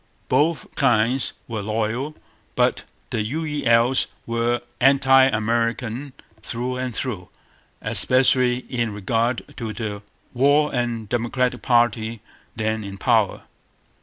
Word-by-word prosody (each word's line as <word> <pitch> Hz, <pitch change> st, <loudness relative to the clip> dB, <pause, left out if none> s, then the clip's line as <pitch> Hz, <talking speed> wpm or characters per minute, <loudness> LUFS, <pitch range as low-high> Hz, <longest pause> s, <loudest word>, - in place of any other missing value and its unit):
Both 155 Hz, 0 st, +1 dB
kinds 125 Hz, -1 st, +2 dB
were 110 Hz, -3 st, -4 dB
loyal. 115 Hz, +7 st, -2 dB, 0.4 s
But -, -, +1 dB, 0.3 s
the -, -, 0 dB
'U.E.L.'s' 130 Hz, -2 st, +1 dB, 0.2 s
were 115 Hz, +1 st, 0 dB, 0.2 s
anti 135 Hz, 0 st, +6 dB
American 115 Hz, +2 st, -1 dB, 0.3 s
through 125 Hz, +2 st, -3 dB
and 130 Hz, 0 st, -3 dB
through, 105 Hz, -7 st, -4 dB, 0.5 s
especially 130 Hz, -1 st, +3 dB
in 120 Hz, -3 st, -1 dB
regard 115 Hz, +4 st, -1 dB
to 115 Hz, -3 st, -4 dB
the 105 Hz, -1 st, -5 dB, 0.3 s
war 145 Hz, +4 st, +3 dB
and 120 Hz, -3 st, -2 dB
Democratic 120 Hz, +2 st, -1 dB
party 115 Hz, -2 st, +1 dB, 0.4 s
then 110 Hz, 0 st, -1 dB
in 100 Hz, -1 st, -7 dB
power. -, -, +1 dB
120 Hz, 105 wpm, -22 LUFS, 110-130 Hz, 0.5 s, anti